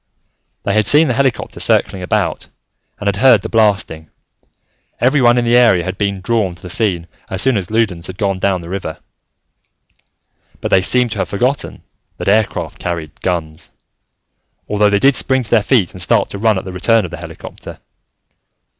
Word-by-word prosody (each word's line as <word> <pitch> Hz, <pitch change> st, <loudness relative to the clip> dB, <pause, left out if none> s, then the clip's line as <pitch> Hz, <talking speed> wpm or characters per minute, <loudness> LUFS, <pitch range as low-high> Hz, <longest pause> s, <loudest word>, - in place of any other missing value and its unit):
They 100 Hz, -, -1 dB
had 110 Hz, -1 st, +2 dB
seen 150 Hz, 0 st, +5 dB
the -, -, +1 dB
helicopter 135 Hz, -3 st, -1 dB
circling 95 Hz, -, +1 dB
about, 90 Hz, -3 st, -1 dB, 0.5 s
and 105 Hz, -, -5 dB
had 100 Hz, -1 st, 0 dB
heard 130 Hz, +4 st, +5 dB
the -, -, -5 dB
blasting: 100 Hz, -8 st, 0 dB, 0.9 s
everyone 125 Hz, -2 st, +3 dB
in 120 Hz, -, +1 dB
the 120 Hz, +1 st, +3 dB
area 115 Hz, -8 st, +5 dB
had 95 Hz, +2 st, -5 dB
been 100 Hz, -2 st, -1 dB
drawn 105 Hz, -4 st, 0 dB
to 85 Hz, -, -17 dB
the 90 Hz, -, -6 dB
scene 95 Hz, -5 st, -1 dB, 0.2 s
as 95 Hz, -, -1 dB
soon 130 Hz, -2 st, +3 dB
as 95 Hz, -4 st, -3 dB
Loudons 100 Hz, -7 st, -1 dB
had 95 Hz, -, -8 dB
gone 100 Hz, -3 st, -1 dB
down 95 Hz, -2 st, 0 dB
the 85 Hz, -, -10 dB
river. 90 Hz, -4 st, -5 dB, 1.6 s
But -, -, -4 dB
they 95 Hz, -, +5 dB
seemed 125 Hz, +4 st, +2 dB
to 105 Hz, -, -4 dB
have -, -, -2 dB
forgotten 125 Hz, +7 st, -2 dB, 0.3 s
that -, -, -6 dB
aircraft 105 Hz, +2 st, 0 dB
carried 80 Hz, -4 st, -5 dB
guns, 80 Hz, -4 st, -3 dB, 1.0 s
although 105 Hz, 0 st, +2 dB
they 100 Hz, -, +2 dB
did 135 Hz, +6 st, +4 dB
spring 130 Hz, 0 st, +1 dB
to 110 Hz, -, -11 dB
their 115 Hz, -, +5 dB
feet 105 Hz, -6 st, +2 dB
and -, -, -8 dB
start -, -, +1 dB
to 100 Hz, -, -6 dB
run 110 Hz, -1 st, +2 dB
at 95 Hz, -, -5 dB
the 95 Hz, -, -7 dB
return 110 Hz, +5 st, +2 dB
of -, -, -8 dB
the -, -, -6 dB
helicopter. -, -, -10 dB
100 Hz, 185 wpm, -16 LUFS, 90-115 Hz, 1.6 s, seen